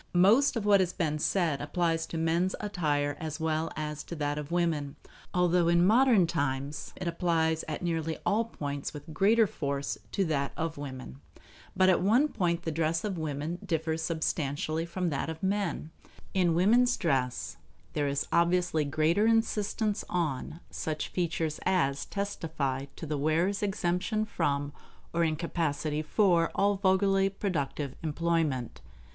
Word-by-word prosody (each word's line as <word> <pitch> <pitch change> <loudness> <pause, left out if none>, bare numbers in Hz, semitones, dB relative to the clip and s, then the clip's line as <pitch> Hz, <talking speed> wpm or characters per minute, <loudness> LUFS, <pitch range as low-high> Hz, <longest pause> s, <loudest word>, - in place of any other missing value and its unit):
Most 225 +11 +5
of 225 -3 -2
what 205 -1 +6
has 185 -1 +1
been 155 -4 -1
said 165 -5 +1
applies 165 +2 0
to 165 - -5
men's 165 +3 +1
attire 150 -8 -1
as 155 0 -5
well 160 0 -1
as 150 -1 -4
to 170 - -6
that 145 -1 -1
of 150 -1 -6
women; 165 -5 0 0.4
although 180 -1 +3
in 170 +1 +4
modern 225 -2 +5
times 145 -3 -2
it 180 - -5
applies 165 -2 +1
at 155 +2 -4
nearly 165 -2 -1
all 225 +3 +2
points 145 -9 -5
with 150 +2 -9
greater 215 +6 +4
force 140 -6 -3
to 195 - +1
that 140 -4 -1
of 165 0 -2
women. 130 - -8 0.5
But 185 - +4
at 185 - +4
one 235 +11 +4
point 175 - -1
the 160 - -2
dress 165 +1 0
of 195 -5 -2
women 155 +3 -3
differs 160 0 -1
substantially 160 0 -1
from 175 0 -2
that 140 +2 -2
of 160 +2 -7
men. 190 -5 -1 0.4
In 175 -3 +2
woman's 240 +8 +4
dress 125 - -1 0.4
there 145 -1 0
is 140 0 -1
obviously 170 -2 +2
greater 155 +8 +2
insistence 220 -1 +1
on 160 -1 -2
such 155 -1 -3
features 165 -3 -1
as 150 -7 +1
testify 155 -9 -3
to - - -7
the 150 -1 -2
wearer's 165 +7 +1
exemption 200 +2 0
from 145 -8 -1 0.4
or 170 0 +2
incapacity 155 -2 -1
for 170 0 +3
all 200 0 +2
vulgarly 195 0 +3
productive 150 -8 -3
employment. 160 -5 -1
165 Hz, 150 wpm, -29 LUFS, 150-185 Hz, 0.5 s, what